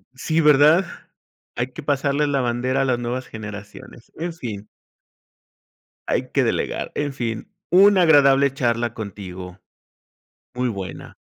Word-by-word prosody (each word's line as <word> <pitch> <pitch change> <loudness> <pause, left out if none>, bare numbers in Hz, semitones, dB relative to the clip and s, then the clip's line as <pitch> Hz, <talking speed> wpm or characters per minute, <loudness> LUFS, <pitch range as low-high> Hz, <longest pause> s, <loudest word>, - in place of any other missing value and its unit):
Sí, 160 +4 0
¿verdad? 150 +5 +5 0.7
Hay 125 +2 -3
que 160 - -9
pasarle 145 +1 +1
la 140 -2 0
bandera 125 +2 0
a - - +1
las 125 -2 +1
nuevas 125 +2 -4
generaciones, 105 +1 -10
en 170 +1 -4
fin. 105 -9 -7 1.4
Hay - - -1
que - - +2
delegar, - - -2
en 145 -1 -2
fin, 120 - -4 0.2
una 195 +1 +6
agradable 140 -3 +5
charla 120 -3 -1
contigo, 95 -3 -8 1.0
muy 125 0 0
buena. 100 -4 -7
130 Hz, 125 wpm, -22 LUFS, 115-145 Hz, 1.4 s, una